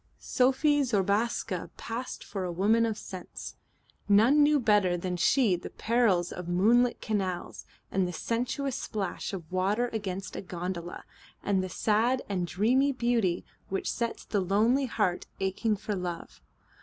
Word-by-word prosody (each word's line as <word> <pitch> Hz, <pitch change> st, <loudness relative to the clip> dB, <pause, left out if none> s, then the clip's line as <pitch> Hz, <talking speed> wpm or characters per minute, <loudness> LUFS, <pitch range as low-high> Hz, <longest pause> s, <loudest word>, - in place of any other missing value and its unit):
Sophie 285 Hz, +3 st, +2 dB
Zobraska 210 Hz, -4 st, 0 dB
passed 235 Hz, +3 st, -5 dB
for 195 Hz, -3 st, -5 dB
a 180 Hz, -, -2 dB
woman 215 Hz, +6 st, +3 dB
of 220 Hz, -2 st, -3 dB
sense. 185 Hz, -2 st, -8 dB, 0.5 s
None 230 Hz, +9 st, +6 dB
knew 295 Hz, 0 st, +5 dB
better 205 Hz, -6 st, +3 dB
than 180 Hz, +1 st, -3 dB
she 215 Hz, +2 st, +3 dB
the 175 Hz, -, -7 dB
perils 215 Hz, -7 st, +1 dB
of 180 Hz, -1 st, -6 dB
moonlit 230 Hz, +8 st, +3 dB
canals 190 Hz, -5 st, -3 dB, 0.2 s
and 190 Hz, -1 st, +1 dB
the -, -, -4 dB
sensuous 250 Hz, -, -2 dB
splash 205 Hz, -7 st, -4 dB
of 185 Hz, -4 st, -7 dB
water 200 Hz, +6 st, +1 dB
against 195 Hz, -3 st, -4 dB
a -, -, -4 dB
gondola, 175 Hz, -1 st, -5 dB, 0.4 s
and 195 Hz, -2 st, +1 dB
the 185 Hz, -, -4 dB
sad 225 Hz, +7 st, +1 dB
and 180 Hz, -3 st, -1 dB
dreamy 250 Hz, +10 st, +2 dB
beauty 235 Hz, -8 st, 0 dB, 0.2 s
which 195 Hz, -, -1 dB
sets 235 Hz, -1 st, -3 dB
the 205 Hz, -, 0 dB
lonely 225 Hz, +9 st, +2 dB
heart 205 Hz, -6 st, -1 dB
aching 195 Hz, +3 st, 0 dB
for 210 Hz, +1 st, -4 dB
love. 180 Hz, -3 st, -5 dB
205 Hz, 145 wpm, -29 LUFS, 185-240 Hz, 0.5 s, None